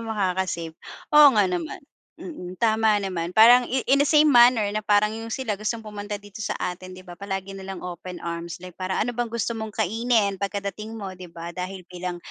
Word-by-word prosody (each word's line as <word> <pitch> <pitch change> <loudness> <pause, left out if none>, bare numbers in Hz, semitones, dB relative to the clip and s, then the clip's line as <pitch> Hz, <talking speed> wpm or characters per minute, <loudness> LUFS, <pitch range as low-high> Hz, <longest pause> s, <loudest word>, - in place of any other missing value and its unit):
makaka-save? 190 -6 -2 0.4
Oo 295 -1 +9
nga 205 - +5
naman, 180 -3 -3 0.4
mm 180 - -8
tama 220 -1 +3
naman. 180 -2 -3
Parang 240 +3 +8
in 260 0 0
in 280 - +5
the 285 - +4
same 300 0 +5
manner 240 -2 +6
na 215 - -1
parang 210 0 +4
'yong 225 +1 -6
sila 225 -7 -3
gustong 225 +1 -2
pumunta 210 0 -6
dito 205 0 -13
sa - - -2
atin, 185 +1 -5
'di 185 - -11
ba? 175 -1 -11
Palagi 195 -1 -4
na 190 - -9
lang 190 -2 -6
open 180 0 -7
arms 170 0 -5
like 180 - -9
para, 185 0 -2
Ano 235 - -1
bang 240 0 -2
gusto 235 0 -2
mong 220 -2 -6
kainin 220 -1 +1
pagkadating 200 +2 -4
mo? 200 -3 -6
'Di 185 -1 -10
ba? 170 0 -8
Dahil 185 +1 -6
bilang, 180 0 -5
200 Hz, 205 wpm, -24 LUFS, 185-225 Hz, 0.4 s, Oo